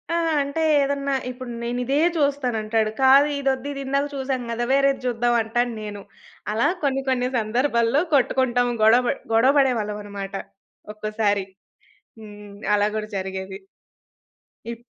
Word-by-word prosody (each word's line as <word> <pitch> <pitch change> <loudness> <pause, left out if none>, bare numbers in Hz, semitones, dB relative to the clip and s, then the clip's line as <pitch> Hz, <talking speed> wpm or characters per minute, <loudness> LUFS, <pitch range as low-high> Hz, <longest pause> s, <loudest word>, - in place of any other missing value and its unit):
ఆహ్, 335 -1 +1
అంటే 280 +3 -3 0.2
ఏదన్నా 280 0 -1 0.2
ఇప్పుడు 250 0 -9
నేనిదే 245 +3 -1 0.2
చూస్తానంటాడు. 230 -7 0
కాదు 270 +2 +6
ఇదొద్దు 270 -1 -1
ఇదిందాక 275 +1 -1
చూసాం 265 -2 -2
గదా! 235 +1 -2
వేరేది 275 0 +2
జూద్దాం 240 0 +1
అంటాను 240 +2 -1
నేను. 205 -1 -7 0.5
అలా 225 +2 +2 0.2
కొన్ని 270 -1 +1
కొన్ని 250 -1 +1
సందర్భాల్లో 235 +3 +1
కొట్టుకుంటాం 250 -2 +2
గొడవ 230 +3 +5
బ - - +3 0.2
గొడవ 255 +5 +5
బడేవాళ్ళమన్నమాట. 210 -6 -2 0.6
ఒక్కోసారి. 215 -2 -1 0.7
హ్మ్. 205 -1 -12 0.2
అలా 205 0 +2
గూడా 215 0 -4
జరిగేది. 190 0 -5 1.1
ఇప్ 235 0 -11
240 Hz, 120 wpm, -23 LUFS, 215-270 Hz, 1.1 s, కాదు